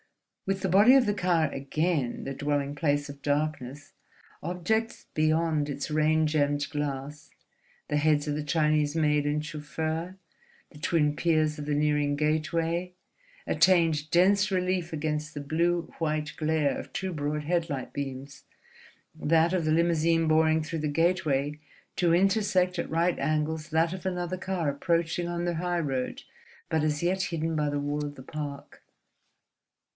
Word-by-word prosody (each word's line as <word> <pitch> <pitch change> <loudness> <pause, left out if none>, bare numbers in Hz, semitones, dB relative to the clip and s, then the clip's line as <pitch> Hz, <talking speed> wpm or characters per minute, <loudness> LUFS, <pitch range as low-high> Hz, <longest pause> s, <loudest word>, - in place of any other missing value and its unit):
With 195 0 -1
the 190 - 0
body 205 +8 +6
of 265 -2 +5
the 205 - +1
car 175 -5 +2
again 140 -1 -1
the 135 - -3
dwelling 145 0 -1
place 145 -1 0
of 140 -1 -10
darkness, 145 -1 -2 0.5
objects 180 +7 -2
beyond 155 -1 +1
its 140 +1 -4
rain 155 +1 +3
gemmed 145 -1 +1
glass—the 145 0 -6
heads 150 0 +2
of 150 - 0
the 150 - -3
Chinese 150 0 +1
maid 150 -2 +2
and 150 +1 -1
chauffeur, 160 +4 -4 0.5
the 150 - -14
twin 150 -3 +1
piers 155 -2 +1
of 145 - -6
the 150 - 0
nearing 150 -1 +1
gateway—attained 165 - 0
dense 200 +4 +4
relief 180 -2 0
against 155 0 -3
the - - -3
blue 170 +4 0
white 155 -2 -1
glare 155 -2 0
of - - -8
two 190 -1 -3
broad 150 0 -2
headlight 160 -4 -2
beams, 140 0 -6 0.7
that 165 +2 +2
of 180 -3 +1
the 155 - +1
limousine 165 0 +2
boring 155 0 +3
through 160 +1 -4
the 150 - -1
gateway 150 -3 +1 0.4
to 170 -2 +2
intersect 190 -1 +2
at - - -3
right 170 +2 +1
angles 155 +2 -1
that 165 +1 +2
of 185 -1 -8
another 180 -1 -2
car 185 -3 -2
approaching 165 +4 0
on 175 0 -2
the 175 -1 -1
highroad 160 -7 -2 0.5
but 160 -1 +1
as 150 +1 0
yet 185 +2 +1
hidden 165 -1 -2
by 150 -1 +1
the 145 0 -1
wall 145 +1 -2
of 145 0 -5
the 130 - -11
park. 145 0 -7
155 Hz, 150 wpm, -28 LUFS, 150-170 Hz, 0.7 s, body